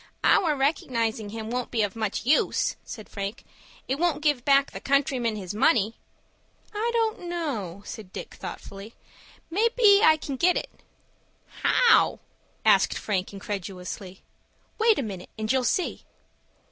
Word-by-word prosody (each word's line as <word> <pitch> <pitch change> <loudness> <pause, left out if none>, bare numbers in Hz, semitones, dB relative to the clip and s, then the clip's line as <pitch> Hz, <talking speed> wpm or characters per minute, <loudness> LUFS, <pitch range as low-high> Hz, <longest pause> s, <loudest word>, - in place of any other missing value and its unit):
"Our 320 -5 +4
recognizing 230 -6 -1
him 220 +1 -6
won't 250 0 -2
be 225 -3 +1
of 205 0 -2
much 220 0 -3
use," 295 +5 +2
said 215 - -9
Frank. 200 +2 -5 0.4
"It 270 +2 -1
won't 320 -4 0
give 295 -5 +2
back 275 0 +4
the - - -7
countryman 265 -5 +1
his 190 -2 -6
money." 220 -1 +3 0.8
"I 435 +3 -1
don't 445 -6 -1
know," 225 - -4
said 210 -5 -9
Dick, - - -8
thoughtfully. 200 +3 -9 0.6
"May 430 +7 +3
be 410 -4 +7
I 315 -7 +6
can 280 -3 -5
get 360 +6 +3
it." - - -4 0.9
"How?" 485 - +4 0.5
asked - - +4
Frank, 190 -3 -2
incredulously. 190 -1 -6 0.6
"Wait 445 -1 +4
a - - 0
minute, 195 -5 -7
and 215 0 -1
you'll 260 -1 +2
see." 360 +8 0
245 Hz, 145 wpm, -26 LUFS, 205-315 Hz, 0.9 s, be